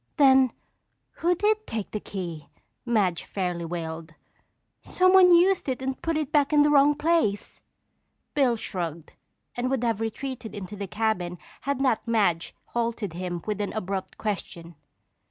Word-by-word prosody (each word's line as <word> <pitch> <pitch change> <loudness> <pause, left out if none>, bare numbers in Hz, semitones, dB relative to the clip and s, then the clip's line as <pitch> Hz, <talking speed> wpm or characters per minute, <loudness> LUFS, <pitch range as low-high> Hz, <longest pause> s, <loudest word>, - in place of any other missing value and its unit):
"Then 265 -3 +6 0.7
who 350 +2 +3
did 430 +3 +1
take 220 -3 -4
the 210 - -3
key?" 170 -8 -6 0.4
Madge 200 -7 +1
fairly 180 -3 -3
wailed. 165 -1 -6 0.7
"Someone 370 0 +5
used 350 -2 +4
it 255 - -2
and 265 0 -4
put 330 -1 -1
it 305 -2 -2
back 290 -1 +3
in 295 -1 +5
the 295 - +3
wrong 290 0 +5
place." 300 -10 0 0.7
Bill 265 -5 +3
shrugged 170 -7 -5 0.4
and 245 +1 -1
would 265 -2 -1
have 225 -2 0
retreated 225 +1 -5
into 205 0 -7
the 200 -1 -5
cabin 185 -4 -1 0.3
had 280 -2 0
not 255 -4 +1
Madge 200 -8 +1
halted 230 -5 -2
him 175 -1 -4
with 210 -1 -2
an 205 - -3
abrupt 195 -2 -4
question. 175 -5 -5
225 Hz, 150 wpm, -26 LUFS, 185-280 Hz, 0.7 s, Then